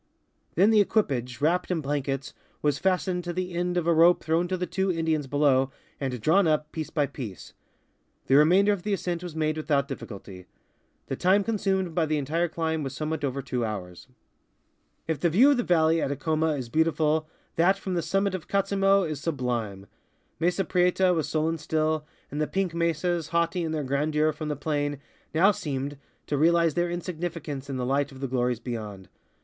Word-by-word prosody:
Then 195 +6 +5
the 215 -2 +6
equipage, 130 - 0
wrapped 175 +4 +1
in 180 -3 0
blankets, 140 -1 -3 0.3
was 145 -1 +1
fastened 185 -1 0
to 175 - -3
the 180 0 -3
end 180 +1 -1
of 175 - 0
a 170 - +4
rope 170 +2 +5
throwai 165 +2 +1
to 185 - -1
the 180 - -2
two 190 +2 0
Indians 160 -4 -1
below 135 -2 +3 0.3
and 130 -3 -3
drawn 165 - +3
up, 155 -1 0
piece 155 -2 -4
by 145 -2 +1
piece. 110 -9 -8 0.7
The - - +1
remainder 185 +8 +5
of 200 - -4
the 210 +2 -1
ascent 175 -3 -2
was 175 -3 -7
made 155 -1 0
without 145 -3 +1
difficulty. 100 -8 -8 0.6
The - - -3
time 195 +3 +3
consumed 190 -5 -1
by 160 -1 +1
the 155 0 0
entire 160 +5 0
climb 160 -1 -2
was 135 -2 -4
somewhat 155 +1 -3
over 135 0 -2
two 125 -2 -2
hours. 95 -5 -5 1.0
If 160 -2 -1
the 170 - +2
view 230 - +6
from 285 - +4
the 245 - +1
valley 160 -1 +3
at - - -1
Acoma 155 +2 0
is 130 -4 -4
beautiful, 155 +2 +1 0.3
that 185 +4 +3
from 190 -1 -4
the 175 - 0
summit 195 +3 0
of 185 -4 -5
Katzimo 195 0 +2
is 155 -4 -4
sublime. 120 - -2 0.5
Mesa 180 +4 +1
Prieta 180 0 +3
was 160 -3 -1
sullen 160 +1 0
still, 155 0 -1 0.2
and 150 - -2
the 155 - +1
pink 190 -3 -1
mesas, 170 0 0
haughty 170 +2 0
in 165 -2 -2
their 155 -2 -2
grandeur 150 +3 +1
from 155 0 -5
the 150 - -1
plain, 145 0 -2 0.4
now 190 +6 +6
seemed 140 -5 -4 0.3
to 145 - -1
realize 170 0 +4
their 175 +2 0
insignificance 170 -5 -5
in 135 - -3
the 125 - -2
light 140 +2 0
of 135 - -12
the 135 - -2
glories 125 -2 0
beyond. 105 -6 -6
160 Hz, 190 wpm, -26 LUFS, 140-175 Hz, 1.0 s, the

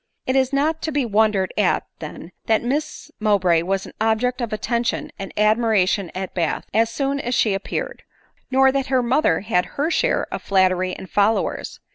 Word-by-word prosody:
It 260 - 0
is 265 0 +2
not 305 +3 0
to 315 - -2
be 280 -3 0
wondered 210 -3 +1
at, 200 - +2
then, 160 +2 -8 0.2
that 220 0 +2
Miss 295 +4 -3
Mowbray 190 -6 +3
was 195 +2 -2
an - - -12
object 240 +4 +1
of 235 -2 -3
attention 235 +2 -2
and 195 - -6
admiration 210 -4 +2
at 190 0 -4
Bath, 170 -4 -1
as 225 +2 +3
soon 275 +4 -1
as 245 -2 -2
she 215 -4 +2
appeared, 195 - -4 0.5
nor 265 0 +4
that 270 -1 -1
her 255 -2 +2
mother 240 - +2
had 190 -4 +1
her 300 +4 0
share - - +1
j)f - - -4
flattery 185 -1 +1
and 190 - -9
followers. 205 +4 0
220 Hz, 180 wpm, -21 LUFS, 195-260 Hz, 0.5 s, nor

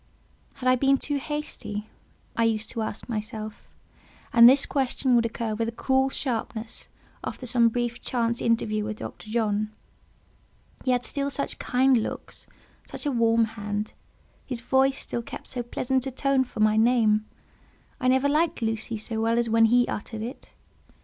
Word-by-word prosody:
Had 255 - -4
I 255 - +6
been 275 +2 +3
too 290 +2 -1
hasty? 270 -8 -5 0.5
I 230 - +2
used 220 -1 0
to 230 - -3
ask 215 -1 -4
myself; 215 -1 -5 0.7
and 235 0 +10
this 270 +2 +5
question 265 -1 +1
would 230 -1 +3
occur 225 -1 -3
with 225 +1 -1
a - - -2
cruel 265 +3 +1
sharpness 230 -4 -3 0.4
after 255 - -5
some 235 -1 +4
brief 240 0 -2
chance 235 -1 0
interview 215 -2 +1
with 215 0 -4
Dr. 215 - -8
John. 215 -2 0 1.1
He - - -1
had 250 -1 +2
still 280 -1 -1
such 280 0 -2
kind 255 -1 +3
looks, - - -7 0.4
such - - -5
a 290 - +1
warm 230 -2 +3
hand; 210 -1 -4 0.5
his 250 -3 -5
voice 265 +2 +2
still 235 - -2
kept - - -9
so 250 - -3
pleasant 255 +2 -1
a - - 0
tone 265 0 +1
for 225 - -6
my 215 0 +4
name; 220 -2 +3 0.7
I 255 - 0
never 260 +2 +4
liked 300 -3 +1
"Lucy" 225 0 -2
so 220 +1 -3
well 230 +1 +2
as 235 -1 +1
when 225 0 +6
he 245 +2 +4
uttered 215 +1 -4
it. 245 +5 -8
235 Hz, 170 wpm, -26 LUFS, 220-260 Hz, 1.1 s, and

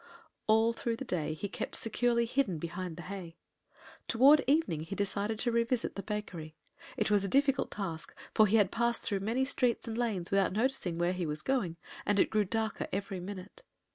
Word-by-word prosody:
All 220 +1 +4
through 230 0 -2
the 270 - -6
day 155 -7 -1
he 205 - -4
kept - - -4
securely 235 +1 +1
hidden 230 -7 0
behind 170 +1 -5
the 170 - -7
hay. 180 -2 -7 0.7
Toward 275 +5 +6
evening 275 - +2
he 165 +5 -5
decided 205 +2 -1
to 240 +2 0
revisit 235 +1 +1
the 195 - -3
bakery. 185 -6 -5 0.4
It - - +1
was 205 -1 +4
a - - -1
difficult 275 +3 +2
task, 170 -6 -5 0.2
for 215 - +6
he 210 - +2
had 205 -4 +4
passed 235 0 0
through 200 -2 0
many 230 +7 0
streets 250 -4 +1
and 225 - -3
lanes 215 -7 -1
without 195 -2 +3
noticing 220 -6 0
where 175 +1 +1
he 180 -3 -2
was 150 0 -3
going, 205 -12 0 0.3
and 205 -1 +1
it - - +3
grew 215 -1 +2
darker 220 +2 -1
every 195 -1 -3
minute. 190 - -8
205 Hz, 195 wpm, -32 LUFS, 180-235 Hz, 0.7 s, Toward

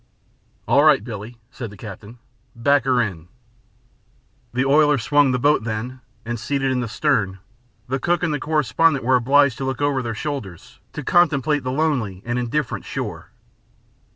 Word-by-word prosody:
"All 135 +6 +4
right, 150 -8 +5
Billie," 115 0 -8
said 120 -4 -7
the 100 - -13
captain. 105 +3 -10 0.4
"Back 135 +3 +2
her 130 -2 +2
in." 90 -8 -2 1.2
The 130 +2 0
oiler 150 +1 +4
swung 145 +3 +3
the 125 - +1
boat 145 0 +2
then 115 +4 -5 0.2
and, 120 0 -4
seated 135 +1 -1
in 130 - 0
the 120 - -2
stern, 105 -6 0 0.5
the 135 +2 -2
cook 175 +5 0
and 165 -3 0
the 145 - -2
correspondent 150 -1 +1
were 130 +1 +4
obliged 135 +1 +3
to - - -3
look 130 -1 -3
over 145 -2 +1
their 115 -2 -4
shoulders 110 - -6
to 150 - -6
contemplate 150 -3 +2
the 130 - -2
lonely 130 -10 -1
and 120 +1 -1
indifferent 125 +2 -2
shore. - - -6
130 Hz, 165 wpm, -21 LUFS, 115-145 Hz, 1.2 s, right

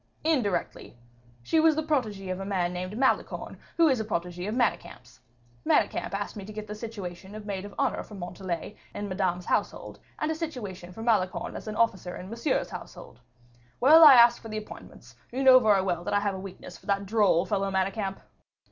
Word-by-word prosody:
"Indirectly. 230 - -1 0.5
She 320 - +2
was 315 -1 +5
the 315 - -1
protegee 215 -11 -1
of 185 - -4
a - - -4
man 185 -3 -1
named 185 +4 -5
Malicorne, 265 +1 0 0.2
who 335 -1 +6
is 265 -5 +2
a - - -1
protegee 180 -3 -4
of 215 - -2
Manicamp's; 125 - -2 0.4
Manicamp - - +1
asked 205 +1 -4
me 205 - -7
to 210 - -9
get 215 0 -6
the 210 - -7
situation 205 -3 -8
of 215 -1 -8
maid 200 -2 -4
of 205 - -11
honor - - 0
for 210 - -11
Montalais 180 +1 -5 0.2
in 205 - -4
Madame's 185 -2 -1
household, - - -2 0.2
and 305 +1 -1
a - - +1
situation 235 - -6
for 225 +5 -8
Malicorne 210 -6 0
as - - -8
an 215 - -4
officer 190 -6 0
in 185 +3 -9
Monsieur's 235 +6 -1
household. 120 - -10 0.6
Well, 310 +6 +8
I 290 -4 +11
asked 235 0 +7
for 225 - -10
the 215 - -4
appointments, 215 - -11 0.2
for - - -13
you 270 - 0
know 260 -1 +9
very 210 -5 +3
well 175 -3 -1
that - - -1
I 205 - +3
have 200 -1 0
a 190 - -6
weakness 190 -1 -10
for - - -21
that 200 0 0
droll 200 -5 +3
fellow 195 -2 -1
Manicamp." 195 +1 -2
205 Hz, 205 wpm, -27 LUFS, 185-230 Hz, 0.6 s, I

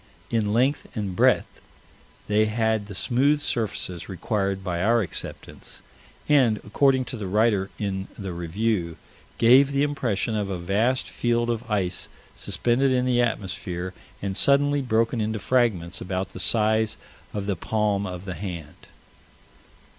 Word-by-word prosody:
In 110 -3 +1
length 130 +6 +1
and 100 -4 -3
breadth - - +2 0.7
they 105 +1 +3
had 110 -1 0
the 100 - -8
smooth 140 +8 +2
surfaces 105 - -3
required 95 0 -2
by 85 -2 -2
our 115 +3 +3
acceptance: 90 - -7 0.4
and, 130 -7 +4
according 130 +4 +2
to 125 +1 -6
the 105 -3 -4
writer 105 -1 +2
in 95 -2 -3
the 95 -3 -5
Review, 85 0 -1 0.4
"gave 130 +4 +6
the 140 0 +2
impression 120 -7 -1
of 105 -2 -1
a 95 - -2
vast 105 +9 0
field 120 0 0
of 120 +1 -4
ice 95 -4 -1 0.3
suspended 125 +3 +1
in 125 -1 +2
the 125 -1 +3
atmosphere, 95 -5 -3 0.3
and 95 -1 -2
suddenly 140 +4 +4
broken 115 -2 +1
into 110 +1 -1
fragments 110 -8 0
about 95 +1 -3
the - - -9
size 110 0 +2 0.3
of 105 -2 -4
the 100 -1 -1
palm 105 +2 0
of 90 0 -7
the 90 - -4
hand." 85 -4 -8
110 Hz, 145 wpm, -25 LUFS, 95-120 Hz, 0.7 s, gave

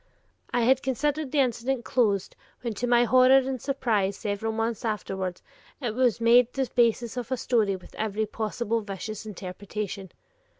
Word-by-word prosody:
I 245 - +1
had 260 +3 +4
considered 285 +2 -1
the 290 - +3
incident 250 0 -1
closed, 205 -6 +1 0.3
when 235 -3 -3
to 245 +4 -3
my 240 0 +5
horror 255 +2 +6
and 265 -2 -1
surprise 220 -8 0
several 210 +2 -2
months 225 0 -2
afterward 190 -4 -3 0.4
it 240 -6 -2
was 245 -1 +2
made 235 +1 +5
the 265 -1 -1
basis 235 0 +2
of 245 0 -5
a 260 - +1
story 220 -6 +1
with 185 - -13
every 220 0 -1
possible 225 +1 -2
vicious 210 +2 -6
interpretation. 195 0 -6
230 Hz, 160 wpm, -26 LUFS, 210-255 Hz, 0.4 s, horror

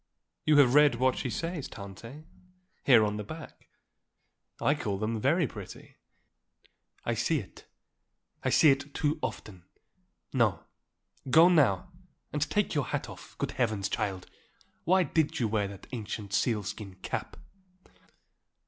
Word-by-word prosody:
"You 155 -1 +5
have 130 -4 +6
read 150 -3 +6
what 130 +2 +2
she 125 - -3
says, 165 - -3
Tante, 115 +9 -10 0.6
here 120 -5 +6
on 105 0 -2
the 105 - -4
back? 160 +9 -10 0.9
I 145 - +3
call 105 -10 -3
that 110 +2 -2
very 155 +9 +2
pretty." 105 -7 -10 1.1
"I 120 - +1
see 135 +8 +1
it. 105 -9 -9 0.8
I - - +1
see 155 - +6
it 140 +1 -3
too 150 +1 0
often. 95 -5 -6 0.7
No. - - +2 0.7
Go 165 +7 +7
now, 140 - +3 0.4
and 150 - -2
take 210 -1 0
your 145 -4 0
hat - - -3
off. - - -12
Good - - -2
heavens, 110 -5 -1
child, 95 -2 -2 0.6
why 185 +2 +4
did 155 -1 0
you 120 - +1
wear 105 -2 0
that 100 -1 -10
ancient 105 -4 -5
sealskin 105 -2 -1
cap?" - - -4
120 Hz, 140 wpm, -29 LUFS, 105-150 Hz, 1.1 s, Go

